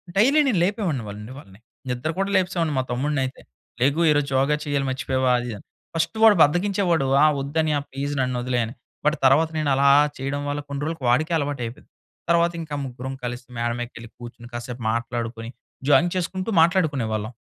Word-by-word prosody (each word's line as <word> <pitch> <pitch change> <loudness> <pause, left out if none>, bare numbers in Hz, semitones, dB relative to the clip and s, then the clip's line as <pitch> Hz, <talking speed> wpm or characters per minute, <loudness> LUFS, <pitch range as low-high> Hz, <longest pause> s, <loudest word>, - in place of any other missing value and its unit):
Daily 260 +10 +4
నేను 205 -9 +2
లేపేవాడిని 180 - -1
వాళ్ళండి 105 +4 -8
వాళ్ళని. 100 -6 -14 0.3
నిద్ర 125 +5 -2
కూడా 195 +1 0
లేపేసేవాడిని 175 -4 +1
మా 130 - 0
తమ్ముడినయితే. 135 +1 -2 0.4
లెగు, 140 +5 +2
ఈరోజు 145 -1 +1
యోగా 140 +3 +2
చెయ్యాలి 140 -2 -1
మర్చిపోయావా 130 0 0
అది 120 - -5
ఇది 110 - -4
అని. - - -16 0.3
ఫస్ట్ 165 +6 -1
వాడు 220 -2 +8
బద్ధకించేవాడు. 175 -1 +1 0.2
ఆ! - - +7 0.2
ఒద్దన్నయ్య 150 +1 0
ప్లీజ్ 140 +2 -3
నన్నొదిలెయ్ 125 -1 0
అని, 115 - -8 0.3
బట్ 150 +2 +2
తర్వాత 155 +5 +5
నేనలా 140 -2 +3 0.3
చెయడం 135 +2 -3
వల్ల 145 +1 -2
కొన్ని 140 0 -5
రోలుకు 160 -3 -4
వాడికే 155 +7 +2
అలవాటయిపోయింది. 135 -5 -4 0.4
తర్వాతింక 170 -2 +1
ముగ్గురం 130 +1 -6
కలిసి 120 +1 -5
మేడ 120 0 0
మీకెళ్లి 120 -1 -7
కూచ్చుని, 120 0 -10
కాసేపు 120 0 -6
మాట్లాడుకొని, 115 0 -3 0.4
జాగింగ్ 175 +4 +4
చేసుకుంటూ 185 +3 -2
మాట్లాడుకునేవాళ్ళం. 135 - +1
140 Hz, 160 wpm, -23 LUFS, 120-165 Hz, 0.4 s, వాడు